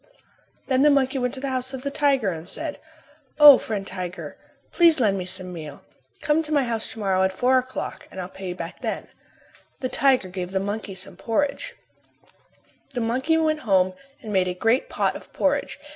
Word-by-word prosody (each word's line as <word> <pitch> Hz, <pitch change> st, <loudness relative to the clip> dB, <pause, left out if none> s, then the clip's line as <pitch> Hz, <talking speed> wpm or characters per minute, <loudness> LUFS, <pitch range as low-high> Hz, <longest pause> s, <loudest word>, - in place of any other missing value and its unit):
Then 260 Hz, -1 st, +2 dB
the 295 Hz, -, +6 dB
monkey 270 Hz, -1 st, +2 dB
went 250 Hz, +1 st, -1 dB
to -, -, -7 dB
the 275 Hz, +1 st, -3 dB
house 260 Hz, +1 st, -2 dB
of 260 Hz, -, -8 dB
the 280 Hz, -, -2 dB
tiger 275 Hz, -9 st, +2 dB
and 165 Hz, 0 st, -7 dB
said, 310 Hz, -1 st, -4 dB, 0.6 s
"O, 295 Hz, -3 st, +10 dB
friend 205 Hz, -3 st, -4 dB
tiger, 185 Hz, -1 st, -6 dB, 0.4 s
please 335 Hz, -3 st, +5 dB
lend 210 Hz, -5 st, +3 dB
me 185 Hz, -2 st, -3 dB
some 185 Hz, 0 st, -2 dB
meal. 155 Hz, -4 st, -9 dB, 0.4 s
Come 300 Hz, +1 st, +2 dB
to 310 Hz, -1 st, -8 dB
my 290 Hz, -3 st, +3 dB
house 230 Hz, -3 st, -2 dB
to -, -, -10 dB
morrow 190 Hz, -2 st, +1 dB
at 190 Hz, 0 st, +2 dB
four 255 Hz, +6 st, +3 dB
o'clock 255 Hz, 0 st, -6 dB
and -, -, -9 dB
I'll 180 Hz, -, -4 dB
pay 190 Hz, +1 st, -9 dB
you 180 Hz, -, -4 dB
back 170 Hz, -2 st, -7 dB
then." -, -, -4 dB, 0.7 s
The 255 Hz, -, -2 dB
tiger 260 Hz, -8 st, +3 dB
gave 180 Hz, 0 st, -5 dB
the 190 Hz, -, +1 dB
monkey 200 Hz, 0 st, -4 dB
some 185 Hz, +1 st, -7 dB
meal. 230 Hz, +6 st, +3 dB, 1.5 s
The 245 Hz, -, -1 dB
monkey 260 Hz, +8 st, +1 dB
went 310 Hz, -1 st, +1 dB
home 190 Hz, -7 st, +2 dB, 0.3 s
and 215 Hz, -2 st, -5 dB
made 185 Hz, -1 st, +2 dB
a 180 Hz, -, -2 dB
great 225 Hz, +7 st, +1 dB
pot -, -, 0 dB
of -, -, -11 dB
porridge. 285 Hz, 0 st, 0 dB
230 Hz, 200 wpm, -24 LUFS, 190-275 Hz, 1.5 s, O